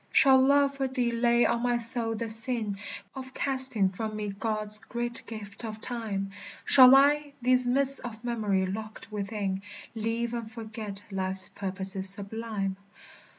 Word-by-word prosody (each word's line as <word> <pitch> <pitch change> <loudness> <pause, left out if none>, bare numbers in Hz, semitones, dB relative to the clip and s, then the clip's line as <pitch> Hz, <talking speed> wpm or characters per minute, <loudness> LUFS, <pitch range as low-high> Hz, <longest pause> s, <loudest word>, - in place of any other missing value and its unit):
Shall 265 -1 +6
love 280 +1 +3
for 270 -1 0
thee 250 -2 -1
lay 235 0 +3
on 235 - +1
my 245 0 +1
soul 230 -1 +1
the 230 +1 -3
sin 225 -2 +1 0.3
Of 260 -1 -9
casting 260 -8 +3
from 215 +3 -5
me 210 -1 -3
God's 215 +1 -3
great 240 +1 -3
gift 210 -1 -8
of 220 -1 -6
time? 215 -5 -4 0.3
Shall 255 0 +8
I, 290 +1 +4
these 250 0 +3
mists 275 +2 +3
of 230 -2 -8
memory 210 -6 0
locked 215 +3 -7
within, 200 -2 -3 0.3
Leave 230 +1 -2
and 230 -2 -5
forget 220 -3 -6
life's 190 0 -3
purposes 190 0 -4
sublime? 200 -1 -4
225 Hz, 150 wpm, -28 LUFS, 205-245 Hz, 0.3 s, Shall